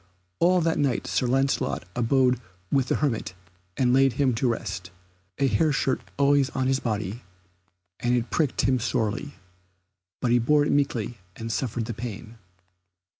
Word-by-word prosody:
All 180 +1 +4
that 165 0 +1
night 140 -4 +1
Sir 125 - 0
Lancelot 135 +2 0
abode 125 +1 +2 0.3
with 135 -2 +2
the - - +1
hermit 115 -10 -1 0.4
and 125 -2 +3
laid 135 -1 +4
him 135 -3 +2
to 125 +3 0
rest, 95 -5 -3 0.5
a 140 - +2
hair 140 +7 +2
shirt 135 -2 0 0.2
always 140 -1 +3
on 130 - 0
his 135 0 +2
body, 110 -1 -3 0.8
and 120 0 +1
it 120 0 -3
pricked 150 -5 +1
him 130 -1 +2
sorely, 120 +3 -2 0.8
but 120 - 0
he 120 - +5
bore 145 +5 +3
it - - 0
meekly 120 -5 0 0.2
and 115 0 -5
suffered 120 -1 -2
the 120 - -4
pain. 115 0 -7
125 Hz, 160 wpm, -26 LUFS, 115-140 Hz, 0.8 s, he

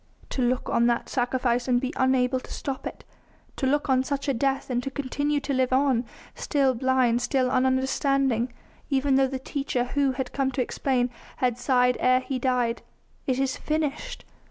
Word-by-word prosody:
To 265 - -2
look 250 +1 0
on 235 0 +3
that 235 -1 0
sacrifice 245 -1 0
and 245 -1 +3
be 260 +3 -3
unable 260 0 +2
to - - -13
stop 270 -2 -4
it. - - -9 0.5
To 265 - 0
look 290 +3 +1
on 260 -1 +3
such 280 +1 -3
a 275 - +2
death 270 +2 -1
and 245 0 0
to 275 - -4
continue 285 +2 -1
to 280 - -2
live 260 -1 +1
on, 260 -2 +2 0.3
still 275 -3 +1
blind, 250 -1 +2
still 255 0 +1
ununderstanding, 260 -1 +1 0.4
even 275 0 +2
though 265 0 +4
the 265 0 -3
Teacher 270 -2 -2
Who 270 +2 0
had 255 -1 -4
come 270 -1 +1
to 255 - 0
explain 250 0 0 0.3
had 250 -2 0
sighed 250 -1 +3
ere 255 0 +4
he 260 0 -3
died: 245 -2 0 0.5
"It 260 -2 +1
is 265 -1 0
finished!" 310 - -3
260 Hz, 180 wpm, -26 LUFS, 250-275 Hz, 0.5 s, though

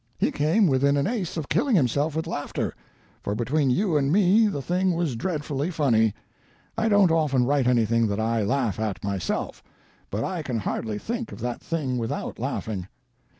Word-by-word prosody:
He - - +1
came 160 +9 +2
within 140 -2 +3
an 140 - +1
ace 200 -7 -2
of 155 -3 -3
killing 270 -6 +2
himself 145 - +1
with 160 - -1
laughter 145 -3 -3 0.5
(for 100 - -2
between 135 +5 +1
you 170 +4 +2
and 140 -1 +1
me 205 +4 +5
the 175 -9 -2
thing 180 +5 0
was 165 -7 -1
dreadfully 150 +1 -2
funny. 115 - +2 0.6
I 225 0 +1
don't 205 -4 +5
often 145 -6 +2
write 140 -1 +2
anything 115 -2 +3
that 100 0 -2
I 115 0 +1
laugh 115 -2 0
at 110 -3 -3
myself, 100 -5 -3 0.5
but 105 +3 -2
I 180 -3 -2
can 125 -6 -3
hardly 110 +1 -3
think 230 - -4
of - - -9
that 120 0 -3
thing 135 -7 -2
without 115 -1 -4
laughing). 95 -5 -3
140 Hz, 180 wpm, -25 LUFS, 115-170 Hz, 0.6 s, me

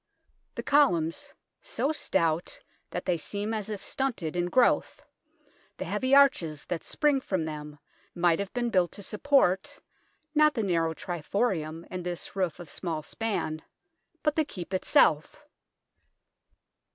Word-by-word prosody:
The - - -4
columns, 175 - +2 0.3
so 285 - -1
stout 170 - 0 0.3
that 180 - -5
they 180 -2 +1
seem 205 +6 -3
as 215 -1 -3
if 210 -2 -5
stunted 225 - -2
in 175 0 0
growth, 245 +7 +2 0.7
the - - -4
heavy 260 +1 +2
arches 170 - +4
that 175 -2 -3
spring 290 -3 +1
from 185 -9 -1
them, 150 -1 -7 0.4
might 175 -1 +3
have 200 -1 -3
been 240 -1 -1
built 180 -3 +2
to 205 - -8
support, 210 -5 +1 0.5
not 305 0 +4
the 225 - 0
narrow 165 -4 +1
triforium 170 -2 -2
and 185 -1 -4
this 175 +1 -5
roof 185 -3 -1
of 175 - -9
small 160 0 -4
span, 175 -7 -3 0.6
but 300 - +2
the 315 - +3
Keep 190 - -8
itself. 160 - +2
185 Hz, 140 wpm, -28 LUFS, 165-240 Hz, 0.7 s, arches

